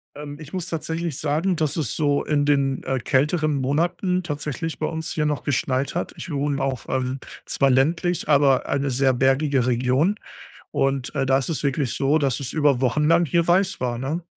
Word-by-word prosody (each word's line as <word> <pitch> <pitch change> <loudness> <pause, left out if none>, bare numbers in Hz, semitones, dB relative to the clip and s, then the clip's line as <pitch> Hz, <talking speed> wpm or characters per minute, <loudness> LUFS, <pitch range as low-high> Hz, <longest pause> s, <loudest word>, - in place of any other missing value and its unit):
Ähm, 145 0 -8
ich 155 +1 -11
muss 180 -2 -3
tatsächlich 165 -2 -3
sagen, 160 +5 0
dass 155 -3 -1
es 155 - -1
so 145 -2 +1
in 145 -1 +1
den, 140 -2 +1
äh, 130 -1 -1
kälteren 150 +5 +1
Monaten 170 +7 0
tatsächlich 150 +1 -4
bei 155 - -1
uns 160 0 -4
hier 150 -1 -1
noch 150 -1 -1
geschneit 135 +1 -1
hat. 175 - -3
Ich 175 - -7
wohne 140 -1 -1
auf, 135 -3 -3
ähm 130 0 -1 0.3
zwar 135 - +1
ländlich, 165 +7 +1
aber 140 -2 +4
eine 140 0 0
sehr 130 +1 +2
bergige 135 0 +2
Region. 130 - +2 0.6
Und, 135 0 -1
äh, 135 -2 0
da 135 0 +3
ist 135 - -3
es 155 - -2
wirklich 140 -2 0
so, 140 +3 +2
dass 135 -3 0
es 135 - -4
über 145 -5 +2
Wochen 135 +4 +1
lang 170 +1 +4
hier 170 +4 +1
weiß 185 0 +2
war, 120 -2 -2
ne? 150 +7 -3
145 Hz, 195 wpm, -23 LUFS, 135-160 Hz, 0.6 s, aber